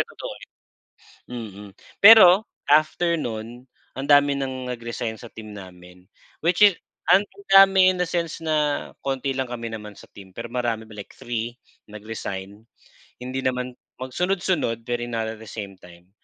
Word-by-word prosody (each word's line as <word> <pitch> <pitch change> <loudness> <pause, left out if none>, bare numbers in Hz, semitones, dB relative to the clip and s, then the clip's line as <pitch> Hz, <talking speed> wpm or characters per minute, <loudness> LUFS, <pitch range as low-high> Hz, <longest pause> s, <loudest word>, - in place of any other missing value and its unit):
totoo, - - -5 0.8
eh, - - -19
mhm. 105 -4 -8 0.4
Pero, 205 -2 +9 0.2
after 155 +3 +3
no'n, 120 -2 -6 0.3
ang 135 +2 -5
dami 145 0 +5
ng 130 -2 -4
nag-resign 115 -1 -5
sa 120 +1 -12
team 110 -2 -10
namin, 90 -1 -13 0.4
which 170 +3 +1
is, 205 -4 +7 0.4
ang 195 +3 +5 0.2
dami 195 -1 +7
in 180 -1 -2
a - - -8
sense 170 -2 -3
na 150 -2 0
konti 135 0 -2
lang 130 -1 -3
kami 115 -2 -6
naman 105 -2 -8
sa - - -14
team, 95 -2 -14
pero 115 +1 -7
marami 120 -3 -2
ma 110 - -16
like 100 - -11
3 120 0 -4 0.3
nag-resign, 105 -2 -7 0.6
hindi 130 +1 -4
naman 125 -1 -2 0.2
magsunod-sunod 175 -3 -1
pero 120 0 -2
not 115 -1 -2
at - - -19
the - - -11
same 100 -3 -7
time. 90 +1 -17
120 Hz, 155 wpm, -23 LUFS, 110-150 Hz, 0.8 s, Pero